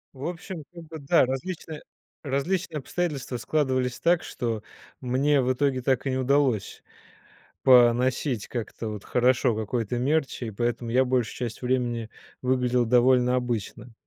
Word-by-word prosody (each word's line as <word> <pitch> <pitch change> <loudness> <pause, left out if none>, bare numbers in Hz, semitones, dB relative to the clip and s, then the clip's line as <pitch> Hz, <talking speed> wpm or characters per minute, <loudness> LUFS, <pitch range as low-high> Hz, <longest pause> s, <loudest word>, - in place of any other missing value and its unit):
В 135 - -7
общем 175 -1 -6
как 170 -1 -10
бы, 160 -1 -8
да, 140 -1 +4
различные, 155 +4 -5 0.4
различные 160 +4 -1
обстоятельства 140 -5 -3
складывались 130 -2 0
так, 175 0 +2
что 115 -3 -3 0.4
мне 135 +3 +2
в 130 0 +1
итоге 130 -1 0
так 130 +1 0
и - - 0
не 130 - -1
удалось 130 -4 +1 0.8
поносить 125 -1 +4
как-то 115 -1 -5
вот 105 -2 -6
хорошо 125 -1 +2
какой-то 110 +2 -2
мерч 140 +3 0
и 115 -3 -4
поэтому 120 +2 -2
я 130 +2 +4
большую 125 -3 0
часть 120 -3 -5
времени 120 -3 -1 0.3
выглядел 125 -1 +1
довольно 125 +1 +4
обычно. 120 -1 -3
125 Hz, 140 wpm, -26 LUFS, 120-140 Hz, 0.8 s, да